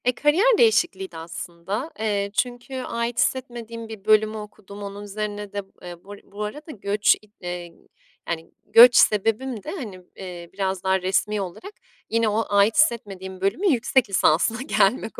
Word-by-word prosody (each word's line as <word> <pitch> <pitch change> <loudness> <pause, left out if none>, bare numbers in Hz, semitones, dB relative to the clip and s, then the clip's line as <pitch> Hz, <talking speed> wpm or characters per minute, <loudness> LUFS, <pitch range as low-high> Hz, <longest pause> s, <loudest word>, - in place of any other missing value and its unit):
E, 250 - +4
kariyer 375 - +3
değişikliğiydi 345 - +2
aslında, 170 - -5
eee, 200 -2 -1
çünkü 245 +3 -2
ait 235 -1 -3
hissetmediğim 235 -3 -2
bir 220 -3 -10
bölümü 215 0 +3
okudum. 205 -1 -10
Onun 200 +1 -7
üzerine 205 0 -5
de, 205 - -2 0.2
eee, 175 -1 -10
bur 205 +1 -10
bu 205 +1 -7
arada 295 +9 -6
göç, 205 -3 +2
i - - -20 0.2
eee, 175 -1 -6 0.6
yani, 165 -1 -4
göç 240 +1 +8
sebebim 225 +2 +2
de - - -5
hani, 215 - -7
eee, 175 -2 -8
biraz 190 -1 -2
daha 190 0 +2
resmî 200 +3 0
olarak 195 - -7 0.4
yine 230 -1 +2
o 220 +2 0
ait 205 +2 +4
hissetmediğim 195 - 0
bölümün 225 - +1
yüksek 250 -3 +2
lisansına 195 +5 +2
gelmek 235 -4 +1
210 Hz, 155 wpm, -23 LUFS, 190-240 Hz, 0.6 s, göç